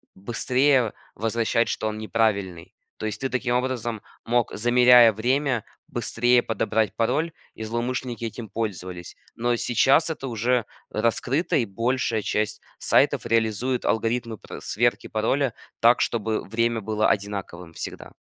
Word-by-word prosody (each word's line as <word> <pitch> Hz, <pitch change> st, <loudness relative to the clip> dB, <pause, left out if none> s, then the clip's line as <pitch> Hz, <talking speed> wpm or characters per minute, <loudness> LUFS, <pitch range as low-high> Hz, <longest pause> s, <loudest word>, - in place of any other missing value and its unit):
быстрее 125 Hz, +4 st, +1 dB, 0.2 s
возвращать, 115 Hz, +1 st, 0 dB
что 110 Hz, -, -2 dB
он 110 Hz, -, -3 dB
неправильный, 100 Hz, -6 st, -1 dB, 0.2 s
то -, -, -5 dB
есть, 110 Hz, -, -4 dB
ты 135 Hz, -, -1 dB
таким 125 Hz, -1 st, -1 dB
образом 120 Hz, -3 st, -2 dB, 0.2 s
мог, 120 Hz, 0 st, +1 dB
замеряя 120 Hz, 0 st, +6 dB
время, 125 Hz, +2 st, 0 dB, 0.2 s
быстрее 120 Hz, +1 st, +2 dB
подобрать 110 Hz, -1 st, 0 dB
пароль, 140 Hz, +9 st, 0 dB, 0.2 s
и 110 Hz, -, -7 dB
злоумышленники 120 Hz, +1 st, -3 dB
этим 115 Hz, -1 st, -6 dB
пользовались, 90 Hz, -5 st, -5 dB, 0.2 s
но 120 Hz, +1 st, +1 dB
сейчас 135 Hz, +8 st, +3 dB
это 145 Hz, -4 st, -4 dB
уже 120 Hz, 0 st, 0 dB, 0.2 s
раскрыто, 120 Hz, +8 st, 0 dB
и 120 Hz, -, +1 dB
большая 115 Hz, +2 st, 0 dB
часть 105 Hz, +1 st, -1 dB, 0.2 s
сайтов -, -, +3 dB
реализует 115 Hz, +3 st, 0 dB
алгоритмы 115 Hz, 0 st, 0 dB
пр -, -, -9 dB
сверки 120 Hz, +3 st, 0 dB
пароля 120 Hz, +4 st, 0 dB, 0.3 s
так, 120 Hz, +2 st, +5 dB
чтобы 110 Hz, -1 st, -1 dB
время 115 Hz, +2 st, 0 dB
было 110 Hz, +1 st, +1 dB
одинаковым 95 Hz, -4 st, -3 dB
всегда. -, -, -7 dB
115 Hz, 130 wpm, -24 LUFS, 110-125 Hz, 0.3 s, замеряя